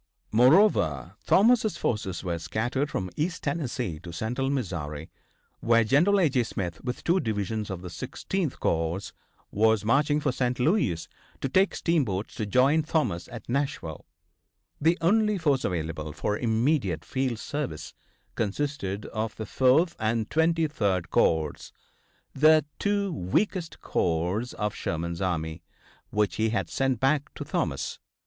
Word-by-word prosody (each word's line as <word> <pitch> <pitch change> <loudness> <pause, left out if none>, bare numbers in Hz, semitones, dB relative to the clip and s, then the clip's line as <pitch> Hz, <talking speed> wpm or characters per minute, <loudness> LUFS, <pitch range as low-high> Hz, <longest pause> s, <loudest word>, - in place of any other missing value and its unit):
Moreover, 120 - +4
Thomas' 220 +1 +4
forces 95 -6 -2
were 85 -2 -2
scattered 120 - -1
from 95 -10 -3
East 165 +3 -2
Tennessee 125 - -2
to 85 +1 -9
Central 120 +9 -2
Missouri, 85 - -3 0.5
where 115 0 +4
General 170 - +4
A.J. 140 -7 +3
Smith, 90 -7 -5
with 125 - -4
two 175 +3 +3
divisions 110 - -2
of 95 -2 -5
the 90 - -6
Sixteenth 170 - -3
corps, 80 +4 -1 0.4
was 110 0 +2
marching 145 +5 +3
for 145 -2 0
St. 125 0 -1
Louis 125 - +1 0.3
to - - -1
take 190 +8 +2
steamboats 120 - 0
to 105 - -3
join 135 +8 +4
Thomas 150 - -1
at 120 -1 -9
Nashville. 130 - -3 0.7
The 165 +3 +3
only 210 +4 +3
force 145 -6 +1
available 80 -3 -3
for 90 +7 -1
immediate 115 - 0
field 130 -3 -1
service 110 - -5 0.4
consisted 105 -3 -2
of 110 -1 -3
the 110 - -5
Fourth 135 - +3
and 110 0 0
the - - -34
Twenty 165 +1 +2
third 95 - -1
corps, 80 -2 +1 0.6
the 155 +1 +5
two 200 -2 0
weakest 165 - -1
corps 90 +8 0
of 105 -1 -2
Sherman's 85 +2 -3
army, 85 -3 -2 0.5
which 105 -4 0
he 110 0 +2
had 115 - -2
sent 135 -3 0
back 140 +2 +1
to - - -5
Thomas. - - -2
115 Hz, 140 wpm, -27 LUFS, 95-150 Hz, 0.7 s, the